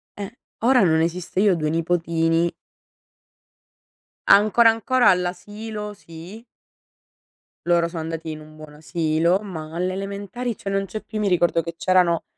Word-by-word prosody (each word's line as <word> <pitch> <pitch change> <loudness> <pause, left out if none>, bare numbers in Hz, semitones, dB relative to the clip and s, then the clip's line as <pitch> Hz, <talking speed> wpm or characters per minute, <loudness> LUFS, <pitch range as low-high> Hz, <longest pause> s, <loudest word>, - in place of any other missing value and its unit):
eh, 205 +2 -7 0.3
ora 250 +2 +4
non 160 -2 +3
esiste, 175 +2 -2
io 200 -1 +4
ho - - 0
2 155 -2 -1
nipotini 165 0 +1 1.8
ancora 215 +3 +6
ancora 240 +3 +3
all'asilo, 210 +4 -3
sì. 180 +4 -12 1.2
Loro 170 -1 +3
sono 165 -1 -5
andati 165 0 -5
in 155 - -7
un 155 0 -14
buon 155 -1 -12
asilo, 160 +3 0
ma 160 -6 -8
alle 180 +2 -1
elementari 200 +5 -4
cioè 195 - -6
non 195 0 -1
c'è 215 +3 -6
più, 220 - -7
io 210 - -1
mi - - +2
ricordo 175 -2 +2
che 170 +1 -7
c'erano 180 -2 +2
180 Hz, 150 wpm, -22 LUFS, 165-205 Hz, 1.8 s, ancora